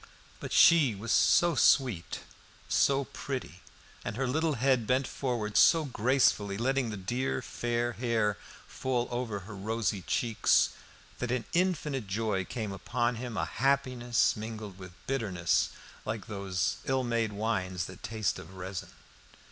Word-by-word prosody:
But - - -7
she 150 -10 +6
was 110 +4 -4
so 175 -1 +5
sweet, 125 - +2 0.5
so 135 - +3
pretty, 125 - -6 0.4
and 105 - -4
her 135 - 0
little 155 +4 +1
head 125 -2 +2
bent 130 +2 +2
forward 120 -7 -3
so 165 -2 +6
gracefully, 120 -5 +2
letting 130 +1 0
the 105 - -5
dear 95 - -2
fair 120 0 -1
hair 110 -4 0 0.3
fall 125 -2 -2
over 120 -5 -3
her 105 +3 -9
rosy 105 -1 -1
cheeks, 115 +5 +2 0.5
that 125 - -2
an 125 -2 -1
infinite 155 - 0
joy 100 -1 -1
came 110 -1 -4
upon 120 +5 -1
him, 120 -2 -5
a - - 0
happiness 130 -3 +1
mingled 110 -3 -7
with 95 -1 -10
bitterness, 95 -10 +1 0.3
like 110 -1 -4
those 95 -5 -2
ill 130 -1 +1
made 115 -3 0
wines 95 -4 -1
that 95 - -10
taste 110 0 -2
of 95 - -12
resin. 95 0 -6
115 Hz, 140 wpm, -30 LUFS, 100-130 Hz, 0.5 s, she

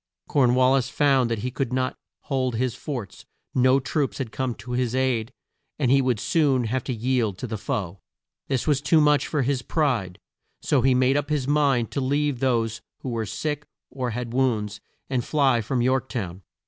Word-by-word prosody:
Corn 125 -4 +3
wal 130 +1 +4
lis 130 -2 +1
found 135 -1 +3
that 115 - 0
he 125 - -2
could 130 -1 -2
not 130 0 0 0.3
hold 130 -3 -1
his 125 +1 0
forts; 125 - -6 0.3
no 130 +1 +4
troops 140 +1 -1
had 130 -5 -4
come 130 -3 -2
to 125 - -9
his 125 -1 0
aid, 130 -3 0 0.5
and 130 -4 +1
he 135 0 +5
would 125 -4 +1
soon 140 -4 +2
have 120 +2 -1
to - - -2
yield 120 -4 0
to - - -5
the 110 -2 -4
foe. 95 -2 -3 0.5
This 130 -3 -1
was 145 -3 +2
too 160 +2 +4
much 150 -1 +3
for 150 -3 0
his 130 0 0
pride, 125 - 0 0.4
so 140 - +2
he 130 +1 +4
made 130 +2 +3
up 145 0 -2
his 145 -4 0
mind 140 -6 +2
to 140 - -2
leave 140 0 0
those 115 -4 0 0.2
who 130 - -4
were 115 -3 -2
sick 150 +6 -3 0.2
or 130 -2 -3
had 120 0 -4
wounds, 115 -6 0 0.3
and 130 -3 -1
fly 135 -5 +2
from 120 +2 -1
York 130 +1 +1
town. 95 -7 -4
130 Hz, 200 wpm, -24 LUFS, 120-135 Hz, 0.5 s, he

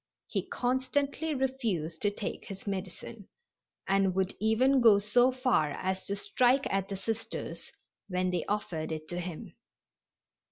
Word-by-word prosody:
He - - -3
constantly 275 +5 0
refused 225 - -1
to 205 - +3
take 205 0 -5
his 195 -1 -8
medicine, 195 +1 -5 0.6
and 195 -1 +2
would 190 0 +1
even 250 +5 +3
go 225 -4 +8
so 240 +5 +4
far 250 - +1
as 190 0 -2
to 200 - 0
strike 265 - +3
at 195 -1 0
the 195 - -3
Sisters 225 +3 -4 0.4
when 185 -1 0
they 175 -2 0
offered 175 -6 -2
it 155 0 -5
to 175 - -3
him. 175 -2 -6
205 Hz, 145 wpm, -30 LUFS, 185-255 Hz, 0.6 s, go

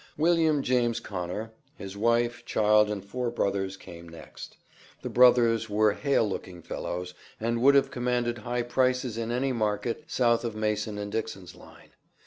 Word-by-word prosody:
William 160 -2 +3
James 120 -2 +1
Conner, 100 +1 -5 0.2
his 95 0 -8
wife, 115 +3 +1
child, 105 0 +3
and 100 -2 -4
four 125 +4 -3
brothers 100 -4 -2
came 85 -2 -12
next. 85 - -11 0.5
The - - -4
brothers 120 -3 +4
were 105 0 +3
hale 140 -2 +1
looking 90 -3 -6
fellows, 90 +1 -5 0.3
and 115 +1 -1
would 140 +2 +6
have 140 - +3
commanded 120 -1 -1
high 120 +3 -2
prices 125 -1 0
in 115 0 -3
any 130 +2 0
market 110 +4 -2
South 120 -7 +2
of 115 -2 -4
Mason 105 -1 -2
and 100 0 -5
Dixon's 100 -5 -5
Line. - - -17
115 Hz, 155 wpm, -27 LUFS, 105-125 Hz, 0.5 s, would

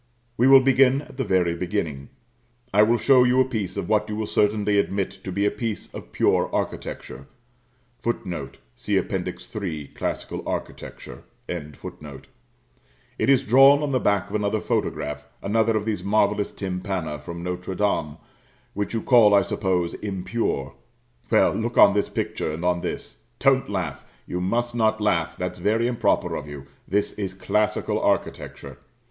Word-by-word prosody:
We 120 +3 +3
will 135 0 +9
begin 135 +1 +4
at 130 - -15
the 135 - 0
very 90 -5 +1
beginning. 85 -6 -3 0.6
I 105 - +6
will 115 +3 +4
show 130 +2 +5
you 125 +1 +3
a 130 - +5
piece 110 -7 -4
of - - -3
what 105 0 +1
you 105 - -3
will 110 0 -2
certainly 105 0 +2
admit 100 -1 -1
to 95 - -5
be 100 +3 0
a 105 - +2
piece 115 -3 -5
of - - -9
pure - - +2
architecture; 70 0 -4 0.7
[Footnote: 90 - -4 0.2
See - - -1
Appendix - - -4
III., 80 -9 -4
"Classical - - -4
Architecture."] - - -6 0.3
it 75 -4 -6 1.5
is 135 -2 +5
drawn 135 +5 +6
on 145 - -1
the 130 - +2
back 100 -3 +1
of 100 - -6
another 105 +1 0
photograph, 75 -7 -2 0.2
another 110 +2 +2
of 105 - -3
these 110 -2 -2
marvellous 105 0 +1
tympana 90 -5 -4
from 85 +4 -8
Notre 90 +1 -4
Dame, 80 -7 0 0.6
which 105 +3 -3
you 115 - -2
call, 115 -5 +6
I 100 - +5
suppose, 90 -4 -1
impure. 95 - -3 0.6
Well, - - +4
look - - -3
on - - +8
this - - 0
picture, - - -3
and 80 +3 -5
on 90 -1 +1
this. - - -6 0.2
Don't 135 0 +3
laugh; 80 -8 -3 0.2
you 90 - -4
must 120 +6 -1
not 110 -2 +1
laugh, 85 -6 0
that's 90 0 -4
very 110 +5 +1
improper 120 -1 +1
of 75 - -5
you, 70 -2 -9 0.2
this 100 +2 0
is 95 -3 -4
classical 105 +2 0
architecture. - - -2
105 Hz, 160 wpm, -24 LUFS, 90-115 Hz, 1.5 s, will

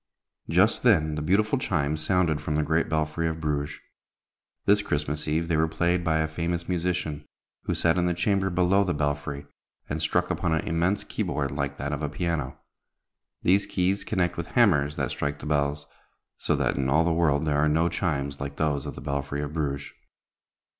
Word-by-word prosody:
Just - - +4
then 80 -1 +4
the 75 - -3
beautiful 105 - +2
chimes 75 - -1
sounded 85 -5 +1
from 75 0 -2
the 75 - +2
great 80 +2 +1
belfry 80 +1 0
of 80 0 -3
Bruges. 75 -1 -2 0.9
This 105 +1 +4
Christmas 75 -5 -2
Eve 80 +2 0
they 85 - +1
were 80 +1 +3
played 85 +2 0
by 80 -1 +2
a 80 0 +1
famous 85 +2 -3
musician, 85 -4 -2 0.4
who - - -1
sat 85 +1 +2
in 90 - +2
the 90 - 0
chamber 95 +2 +1
below 90 +2 +3
the 90 -4 -1
belfry, 75 -1 -2 0.4
and 75 +2 -3
struck 80 - +1
upon 80 - 0
an 80 - -2
immense 85 +5 +1
key - - -5
board 70 -2 -1
like 70 0 -3
that 70 +2 -3
of 75 - -3
a 75 - -1
piano. 75 -3 -2 0.9
These 95 +3 +3
keys 95 +2 0
connect 90 -4 -1
with 85 0 -4
hammers 75 -11 +4
that - - -2
strike 75 0 -2
the - - -10
bells, 70 -1 0 0.5
so - - +1
that - - 0
in 65 -1 0
all 80 +4 +4
the 85 0 +1
world 80 -3 +2
there 75 -1 +1
are 75 +1 +3
no 80 +3 +3
chimes 70 -6 -2
like 70 0 -4
those 75 -3 -1
of - - -6
the - - -8
belfry 70 0 -3
of 75 0 -5
Bruges. 70 -3 -3
80 Hz, 195 wpm, -26 LUFS, 75-85 Hz, 0.9 s, Just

